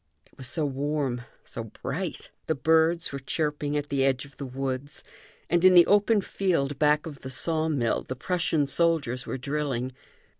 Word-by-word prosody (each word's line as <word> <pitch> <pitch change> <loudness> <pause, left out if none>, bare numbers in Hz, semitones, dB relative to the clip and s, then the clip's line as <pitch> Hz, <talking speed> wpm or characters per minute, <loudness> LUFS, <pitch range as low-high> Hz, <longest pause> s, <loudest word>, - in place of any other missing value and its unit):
It - - -28
was 130 - -8
so 155 +1 0
warm, 140 -2 -1 0.2
so - - -6
bright! - - -5 0.2
The 160 - +1
birds 160 +4 +2
were 140 - -4
chirping 150 +1 -2
at 145 0 -3
the 140 -2 +1
edge 135 0 +1
of 140 - -17
the 140 - -5
woods; 135 +2 -4 0.4
and 175 +1 +2
in 185 0 +7
the 175 - +9
open 205 +1 +4
field 165 -9 -1
back 150 0 +3
of 150 -4 -8
the 130 - -8
saw 160 +5 +1
mill 125 -7 0
the 130 - -6
Prussian 165 0 0
soldiers 140 -5 +1
were - - -3
drilling. 135 -2 -2
145 Hz, 180 wpm, -27 LUFS, 135-160 Hz, 0.4 s, the